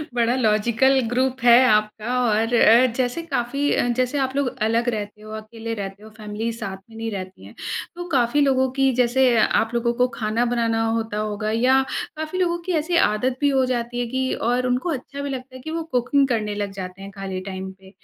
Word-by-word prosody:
बड़ा 240 +1 +2
logical 235 +3 +3
group 260 +1 0
है 240 +1 +7
आपका 215 +3 +1
और 225 +1 +1
अ, 235 +2 +6
जैसे 255 +5 -1
काफ़ी 280 0 -1
अ, 245 - +1
जैसे 255 +3 0
आप 265 0 -1
लोग 280 -2 +1 0.2
अलग 230 +2 +1
रहते 210 -1 -5
हो, 215 0 -11
अकेले 225 +1 -6
रहते 200 0 -7
हो, 220 - -11
फ़ैमिली 215 +2 -4
साथ 215 -5 -6
में 225 - -15
नहीं 225 0 -3
रहती 190 -1 -7
है, - - -13 0.4
तो 350 0 -6
काफ़ी 265 0 +2
लोगों 265 -2 +3
की 270 -1 +4
जैसे 255 +1 +3
आप 225 +1 +2
लोगों 235 0 +1
को 250 - +5
ख़ाना 220 +2 0
बनाना 230 -1 +1
होता 225 -2 -2
होगा 215 0 -2
या 255 +4 +3 0.4
काफ़ी 315 +4 -4
लोगों 345 -1 +1
की 370 - -2
ऐसी 345 +2 -2
आदत 245 +5 -1
भी 285 - +4
हो 265 -1 +2
जाती 245 -1 -2
है 245 - 0
कि 260 +2 -1 0.2
और 250 +1 +1
उनको 250 +7 0
अच्छा 275 +1 -6
भी 280 - -3
लगता 260 -1 -6
है 255 - -9
कि 315 - -6
वो 330 0 -2
कुकिंग 270 +3 +3
करने 215 -4 -1
लग 205 -1 -3
जाते 185 +1 -8
हैं 195 0 -8
ख़ाली 195 -2 -5
टाइम 190 0 -6
पे। 190 0 -17
240 Hz, 215 wpm, -22 LUFS, 215-260 Hz, 0.4 s, है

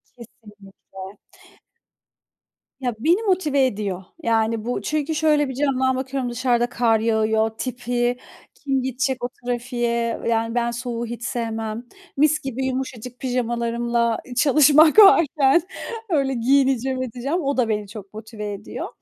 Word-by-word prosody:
Kesinlikle. 205 -4 -13 1.6
Ya, 245 -4 -2
beni 345 - +2
motive 310 -9 +2
ediyor. 200 -6 -3 0.2
Yani 225 -1 0
bu, 245 - -2
çünkü, 305 +1 -2
şöyle 300 -3 +2
bir - - -4
camdan 260 -1 +1
bakıyorum, 260 -1 -3
dışarıda 240 0 0
kar 230 -3 +2
yağıyor, 220 0 +1
tipi, 245 -1 -2 0.4
kim 270 -3 -2
gidecek 260 0 -2
o 245 - -1
trafiğe, 240 -1 -2
yani 230 0 0
ben 235 -1 +1
soğuğu 240 0 -4
hiç 235 0 -7
sevmem. 225 -1 -3 0.3
Mis 305 +1 +3
gibi 265 0 -4
yumuşacık 255 -2 -5
pijamalarımla 235 -2 -1 0.2
çalışmak 305 - +6
varken, 320 -6 +6 0.5
öyle 275 -5 +1
giyineceğim, 260 +1 +1
edeceğim. 260 +8 -3
O 280 -2 -1
da, 235 -3 +1
beni 210 -2 -1
çok 200 -1 -11
motive 215 -1 -7
ediyor. 200 +1 -7
245 Hz, 125 wpm, -22 LUFS, 230-270 Hz, 1.6 s, çalışmak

